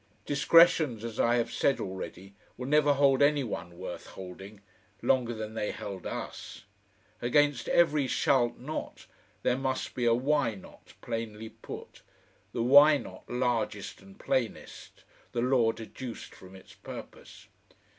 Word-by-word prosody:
Discretions, 150 -4 +4
as 115 -1 -6
I 120 +1 +3
have 120 -1 0
said 140 - +1
already, 95 0 -7 0.2
will 125 - -5
never 145 +1 +4
hold 135 -1 +4
any 145 0 +4
one 85 -7 -6
worth - - -7
holding 95 +2 -10 0.4
longer 125 -3 +2
than 110 0 -6
they 105 -1 -2
held 100 -2 -6
us. - - -7 0.6
Against 145 +2 +2
every 150 -5 +3
"shalt 125 -2 +2
not" 150 +5 -6 0.4
there 125 +1 +1
must 130 -1 -2
be 125 - -2
a 115 - +5
"why 130 -3 +1
not" 95 - -15
plainly 110 -1 -5
put, - - -10 0.5
the 115 - -2
"why 145 +4 +8
not" - - -11
largest 110 -6 -2
and 95 0 -16
plainest, 120 -5 -3 0.3
the 120 - 0
law 125 -2 +3
deduced 115 +2 -8
from 95 0 -14
its 95 - -15
purpose. - - -11
120 Hz, 140 wpm, -29 LUFS, 110-140 Hz, 0.6 s, why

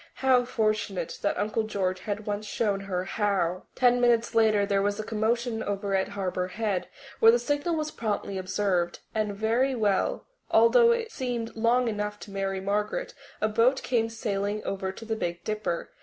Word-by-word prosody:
How 255 -2 +3
fortunate 215 -6 -1
that 200 - 0
Uncle 215 +2 0
George 190 -4 -1
had 210 +2 -4
once 210 0 -3
shown 205 -4 0
her 190 -2 -3
how! 190 -3 -1
Ten 245 -1 +4
minutes 235 -1 +3
later 215 -3 +4
there 200 0 +1
was 205 +1 0
a - - -2
commotion 225 +2 -1
over 200 0 -2
at 190 0 +2
Harbour 185 -2 -2
Head 205 -1 -2 0.3
where 225 - +8
the 240 - +4
signal 290 +7 -1
was 310 -1 -2
promptly 205 -3 -3
observed, 185 -2 0 0.2
and 215 -2 -1
very 230 +6 +1
soon 205 -3 +1 0.3
although 470 0 +6
it 465 -1 -1
seemed 245 - -3
long 235 +2 +2
enough 210 -1 -3
to 205 - -9
Mary 195 -1 -2
Margaret 210 - -2 0.3
a 215 - +3
boat 235 +5 +2
came 230 -2 +1
sailing 210 -2 -2
over 190 -1 -3
to 225 +4 -10
the 220 0 -1
Big 175 -4 -3
Dipper. 215 -5 -3
215 Hz, 175 wpm, -27 LUFS, 195-235 Hz, 0.3 s, where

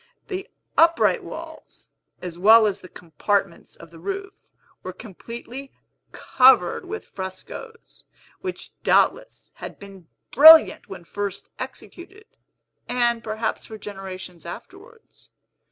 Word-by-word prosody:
The 385 +2 -5 0.3
upright 335 +1 +4
walls, - - -11 0.4
as 175 -2 -6
well 220 +4 +7
as 205 -2 -1
the 185 - -13
compartments 180 +3 -3
of 165 -1 -15
the 165 - -14
roof, 390 - -7 0.3
were 185 - -7
completely 235 +7 -10 0.4
Covered 255 - +3
with 435 +4 -6
frescos, 190 - -9 0.3
which 370 -1 -7
doubtless - - +1
had - - -9
been 195 -4 -14 0.2
brilliant 315 -3 +8
when 190 -3 -9
first 200 +2 -6
executed, 390 +5 -10 0.6
and 240 -1 +1
perhaps 220 0 -3
for 220 - -9
generations 190 -4 -9
afterwards. 415 - -13
220 Hz, 110 wpm, -23 LUFS, -, 0.6 s, brilliant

